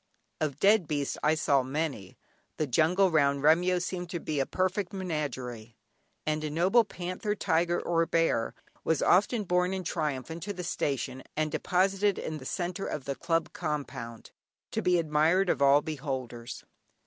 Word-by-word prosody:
Of 150 -3 -1
dead 200 -2 +4
beasts 145 -2 -2
I 155 +1 +3
saw 140 -3 +3
many. 135 - -4 0.4
The 155 - +1
jungle 165 +8 +3
round 140 -3 +2
Remyo 175 +4 +4
seemed 180 0 -4
to 170 - -3
be 155 -2 -2
a 135 - 0
perfect 185 +1 -1
menagerie, 130 - -4 0.5
and 155 0 -1
a 155 - -2
noble 185 +10 +4
panther, 185 +1 -4
tiger 175 -2 +1
or 165 -1 +1
bear 165 -9 +1 0.3
was 160 - +1
often 210 +4 +3
borne 180 0 +1
in 190 - -4
triumph 150 -6 -2
into 170 +5 -5
the 180 -2 -6
station 135 -6 -2 0.2
and 155 0 0
deposited 195 +4 +1
in 155 -1 -4
the 130 - -11
centre 180 +4 -3
of 145 -4 -4
the 140 - -1
Club 165 +3 -1
compound, 140 -8 -5 0.4
to - - -1
be 180 -1 +3
admired 165 +4 +3
of - - -2
all 140 +1 +5
beholders. 130 -6 -5
160 Hz, 160 wpm, -29 LUFS, 140-180 Hz, 0.5 s, all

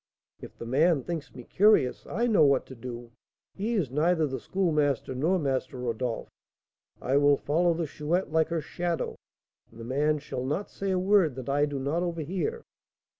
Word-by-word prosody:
"If - - -11
the - - -7
man 145 +4 +3
thinks 165 -3 -5
me 125 - -9
curious, 190 - +3
I 235 - -1
know 215 -9 +4
what 140 -2 +3
to 130 - -11
do; 120 0 -8 0.4
he 220 +4 -2
is 165 - 0
neither 160 +3 +2
the 135 -2 -4
Schoolmaster 150 -9 0
nor 160 +9 +1
Master 135 -4 -2
Rodolph. 120 -1 -3 0.7
I 135 +2 +1
will 145 0 +5
follow 170 +3 +1
the 165 0 -1
Chouette 155 +5 -2
like 160 0 +3
her 165 -1 -2
shadow, 175 +1 -3 0.5
and 115 - -16
the - - -7
man 150 +5 +1
shall 140 -3 -5
not 150 +10 -3
say 195 - -4
a 190 - +1
word 185 -6 +3
that 130 0 -6
I 145 +2 +2
do 145 -1 -4
not 140 +6 -1
overhear. 180 - -3
150 Hz, 180 wpm, -28 LUFS, 130-175 Hz, 0.7 s, will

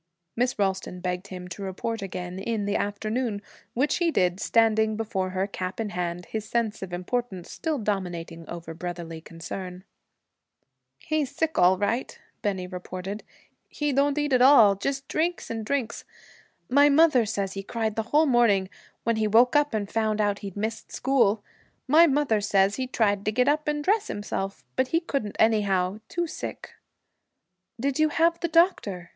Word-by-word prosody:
Miss 250 +2 0
Ralston 190 -2 -1
begged 180 +1 -3
him 180 -1 -8
to 180 - -8
report 195 +4 -4
again 180 -1 -5
in 215 0 -2
the 205 0 -1
afternoon, 215 +2 -2 0.4
which 270 +5 +1
he 345 -1 +2
did, 180 - +1
standing 220 -1 +2
before 195 -4 -2
her, 185 +1 -1
cap 190 -1 -5
in 220 -2 -2
hand, 175 0 -3
his 220 -1 -4
sense 230 -3 -1
of 190 -2 -6
importance 185 0 -3
still 315 -2 -2
dominating 175 - -4
over 170 -1 -7
brotherly 170 -1 -6
concern. 180 +3 -7 1.1
'He's 310 -4 -1
sick, 320 +3 -1
all 180 +1 +5
right,' 215 +6 -1 0.2
Bennie 190 -3 -1
reported. 185 +2 -6 0.5
'He 295 -1 -1
don't 280 +2 +2
eat 295 -2 0
at 250 - +4
all 250 -6 +8
just 270 +7 -3
drinks 340 -2 -1
and 225 -1 -3
drinks. 240 -1 -2 0.6
My 285 +3 +5
mother 290 -4 +5
says 200 -3 -2
he 195 - -4
cried 220 +1 -2
the 225 +1 -3
whole 305 +2 +4
morning, 230 -8 +3 0.3
when 230 -1 +1
he 215 -1 +1
woke 235 +5 +4
up 295 0 +3
and 210 -2 -2
found 220 0 0
out 205 -1 +1
he'd 200 -1 -8
missed 220 +2 -4
school. 230 -6 +2 0.4
My 320 +5 +7
mother 275 -7 +2
says 200 0 +2
he 260 -1 -2
tried 205 -5 +1
to 215 - +1
get 250 +4 +2
up 300 +1 +1
and 295 0 -1
dress 425 +5 +2
himself, 195 -1 -4
but 260 0 +2
he 330 - +2
couldn't 275 - -3
anyhow. 200 -3 +2
Too 345 0 -1
sick.' 325 - -7 1.1
'Did 275 +3 -1
you 310 0 +4
have 335 +2 +2
the 340 - -1
doctor?' 310 - +2
215 Hz, 170 wpm, -26 LUFS, 190-265 Hz, 1.1 s, all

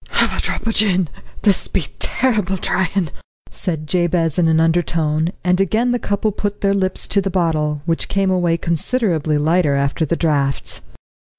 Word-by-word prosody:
"Have - - +2
a - - -1
drop - - -3
o' - - +2
gin; 190 -6 +2 0.3
this 205 -3 +2
be - - -1
terrible 210 -7 +1
tryin'," 180 -2 0 0.4
said 160 -4 -4
Jabez 175 -1 +1
in 170 - +3
an 160 0 +3
undertone; 165 -1 +1
and 180 +1 +2
again 220 +6 +1
the 245 - 0
couple 205 +1 -1
put 205 0 -4
their 200 -1 +2
lips 190 -1 -1
to 200 - +2
the 195 - -2
bottle, 155 -5 0
which 165 -1 -1
came 195 -1 +1
away 175 -2 +1
considerably 170 - 0
lighter 155 -1 +2
after 140 +3 0
the 160 +2 0
draughts. 145 -5 -1
175 Hz, 170 wpm, -19 LUFS, 160-195 Hz, 0.4 s, in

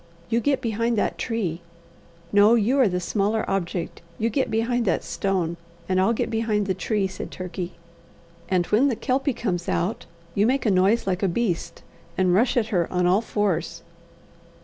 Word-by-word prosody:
"You 230 - +3
get 275 +2 +1
behind 230 0 0
that - - 0
tree 190 -8 -2 0.7
no, 205 +3 +6
you 240 +5 +2
are 255 - +6
the 180 -1 -1
smaller 210 +4 0
object 180 -2 -3 0.2
you 230 +1 0
get 265 +5 0
behind 230 +2 0
that 190 - +1
stone, 180 -4 -1 0.3
and 185 0 +2
I'll 195 - +3
get 230 - -1
behind 220 -2 0
the 190 - 0
tree," 200 +2 -1
said 190 - -5
Turkey; 185 0 -6 0.8
"and 180 -2 +2
when 225 +9 +3
the 255 - +1
Kelpie 270 +4 0
comes 180 -8 -2
out, 190 +6 -1 0.3
you 205 +2 +3
make 265 +2 +1
a 215 - +3
noise 195 +5 +3
like 185 -1 -1
a 195 - +2
beast, 180 -1 -2 0.3
and 185 -1 +3
rush 235 +7 +3
at 220 -2 +1
her 180 -6 0
on 180 -1 +1
all 185 +4 +4
fours." 205 -6 -1
205 Hz, 180 wpm, -24 LUFS, 185-230 Hz, 0.8 s, no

